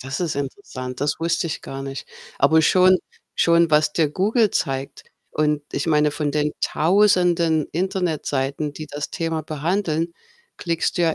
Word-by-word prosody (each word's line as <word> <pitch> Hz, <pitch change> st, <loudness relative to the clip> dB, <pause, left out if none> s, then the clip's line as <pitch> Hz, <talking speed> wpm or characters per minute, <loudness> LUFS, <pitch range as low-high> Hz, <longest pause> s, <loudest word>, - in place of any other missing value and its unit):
Das 130 Hz, +5 st, -5 dB
ist 170 Hz, -3 st, -1 dB
interessant, 130 Hz, -3 st, -6 dB
das 145 Hz, +1 st, 0 dB
wusste 170 Hz, 0 st, 0 dB
ich 160 Hz, -, -4 dB
gar 135 Hz, 0 st, -7 dB
nicht. 135 Hz, 0 st, -6 dB, 0.3 s
Aber 160 Hz, +3 st, +5 dB
schon 185 Hz, +3 st, +5 dB, 0.4 s
schon 170 Hz, -1 st, +3 dB
was 150 Hz, 0 st, +3 dB
dir 155 Hz, -3 st, +1 dB
Google 210 Hz, -, +2 dB
zeigt 135 Hz, 0 st, -3 dB, 0.3 s
und 150 Hz, -1 st, 0 dB
ich -, -, -2 dB
meine, 150 Hz, -2 st, +3 dB
von 145 Hz, 0 st, -2 dB
den 150 Hz, +1 st, 0 dB
1.000en 175 Hz, -3 st, +3 dB
Internetseiten, 155 Hz, -6 st, -1 dB
die 155 Hz, +2 st, -8 dB
das 145 Hz, 0 st, -5 dB
Thema 165 Hz, -1 st, -2 dB
behandeln, 165 Hz, +2 st, -1 dB, 0.5 s
klickst 170 Hz, +1 st, -1 dB
du -, -, +3 dB
ja 165 Hz, -2 st, +2 dB
155 Hz, 155 wpm, -22 LUFS, 145-170 Hz, 0.5 s, Aber